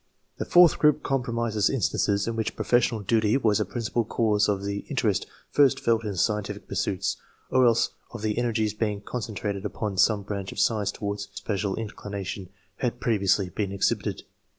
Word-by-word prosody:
The - - -2
fourtli 175 -2 +6
group 150 -1 +4
comprises 115 -5 0
instances 105 -5 +1
in 115 - -2
which 110 -1 -2
professional 120 -2 +2
duty 110 +3 +2
was 110 -6 +2
a - - +1
principal 120 0 -1
cause 105 -2 +1
of 100 -1 0
the 100 0 -2
interest - - 0 0.2
first 140 -3 +4
felt 115 -1 +1
in 105 -3 -3
scientific 105 +2 -1
pursuits, 95 -3 -1 0.3
or 130 -1 +5
else 115 0 +3 0.2
of 115 -3 -8
the 110 +1 0
energies 110 -3 0
being 105 -2 -2
concentrated 105 -3 -4
upon 105 -1 -3
some 105 -2 +4
branch 100 -1 -4
of - - -10
science 105 -3 +2
towards 100 -1 -4
which - - -32
no - - -28
special 100 -2 -1
in 115 -1 -4
clination 100 -2 -6 0.3
had 120 -1 -2
previously 100 -5 +2
been 100 +2 -3
exhibited. 100 -1 -1
105 Hz, 175 wpm, -26 LUFS, 100-115 Hz, 0.3 s, fourtli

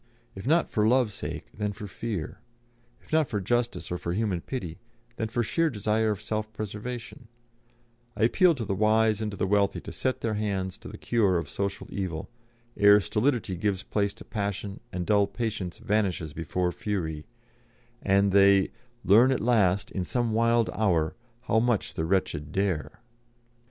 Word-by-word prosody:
If 95 +5 -8
not 165 +4 +3
for 105 -1 +2
Love's 120 -3 +3
sake, - - -5
then 105 -1 -2
for 105 0 -8
fear; 100 -4 -5 0.6
if - - -13
not 155 -2 +4
for 105 - -2
justice 120 +3 -1
or 90 - -2
for 85 - -3
human 100 -4 -1
pity, 90 -10 -5 0.4
then 110 - -1
for 120 +2 -1
sheer 165 +8 +1
desire 110 -2 0
of 105 -3 -1
self 110 0 -3
preservation; 115 +4 -6 0.9
I - - +1
appeal 170 - +4
to 120 -5 -4
the 100 - -1
wise 110 +1 +3
and 110 - -1
to 100 - -7
the - - 0
wealthy 100 0 +2
to - - -8
set 130 -1 -2
their 115 - -1
hands 100 -3 -2
to - - -11
the - - -8
cure 105 -6 +2
of 85 - -3
social 100 0 -3
evil, 90 -5 -4 0.4
ere 100 0 +7
stolidity 110 -1 0
gives 95 +1 -1
place 100 -1 -1
to - - -11
passion 100 -1 -3
and 90 -1 -3
dull 100 0 +3
patience 105 -7 -3
vanishes 100 -8 -1
before 85 +3 -1
fury, 80 -7 -3 0.7
and 100 0 +3
they 100 0 +5 0.3
"'Learn 115 +8 +6
at 130 - +1
last, 100 -4 +2
in 95 - -2
some 120 +3 -1
wild 115 +1 +2
hour, 85 -8 +1 0.3
how 120 -2 +2
much 120 -2 0
the 80 - -2
wretched 80 -5 -1
dare.'" 95 -4 -2
105 Hz, 170 wpm, -27 LUFS, 95-115 Hz, 0.9 s, ere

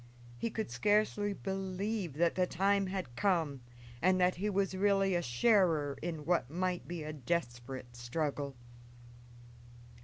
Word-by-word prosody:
He 120 - -2
could 220 -1 -4
scarcely 210 0 +2
believe 195 -1 -3
that 170 +3 +2
the 185 -1 +1
time 195 +2 +2
had 185 -10 -4
come 165 -8 +1 0.4
and 185 +2 +4
that 180 0 +4
he 205 +4 0
was 195 -1 +1
really 195 0 +3
a 175 - +2
sharer 155 - +3
in 160 -3 -4
what 170 -7 +1
might 180 +2 -2
be 170 -2 -4
a 155 0 -5
desperate 125 -4 -3
struggle. 140 +3 -2
180 Hz, 140 wpm, -33 LUFS, 145-195 Hz, 0.4 s, and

